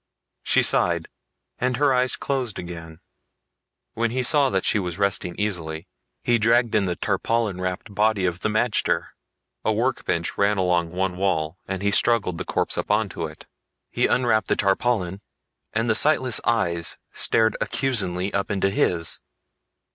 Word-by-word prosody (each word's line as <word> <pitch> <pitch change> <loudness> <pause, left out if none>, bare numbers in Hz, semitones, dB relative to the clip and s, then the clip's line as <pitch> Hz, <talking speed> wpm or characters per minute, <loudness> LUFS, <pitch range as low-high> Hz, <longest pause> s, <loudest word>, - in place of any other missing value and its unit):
She - - +3
sighed - - +2 0.5
and 125 -1 0
her 145 -1 +3
eyes 125 0 +1
closed 130 -6 -3
again. 85 -1 -8 0.9
When 115 +1 0
he 130 +3 -1
saw 140 0 +3
she 105 - +1
was 90 -3 -4
resting 100 -3 -1
easily, 85 -5 -2 0.4
he 120 -1 +2
dragged 115 +1 +3
in 105 -2 +2
the 90 -2 -2
tarpaulin 110 -4 -1
wrapped 90 +3 -4
body 105 -1 +1
of 90 -1 -1
the 110 - -1
magter. 105 -6 +1 0.5
A - - +1
work 120 +4 -1
bench 85 0 -2
ran 100 +1 +2
along 90 -2 +1
one 90 +1 -2
wall 90 -3 -1
and 95 0 -4
he 100 - +2
struggled 100 -6 +1
the - - -4
corpse - - +1
up - - -4
onto - - 0
it. - - -13 0.5
He - - +1
unwrapped 110 -5 +1
the - - +2
tarpaulin 100 -2 0 0.5
and 115 +2 -1
the 110 - +3
sightless 130 0 +3
eyes 85 -7 +1
stared 110 0 +2
accusingly 95 -8 -1
up 100 0 -1
into 95 -1 0
his. 85 -4 0
100 Hz, 155 wpm, -23 LUFS, 90-115 Hz, 0.9 s, She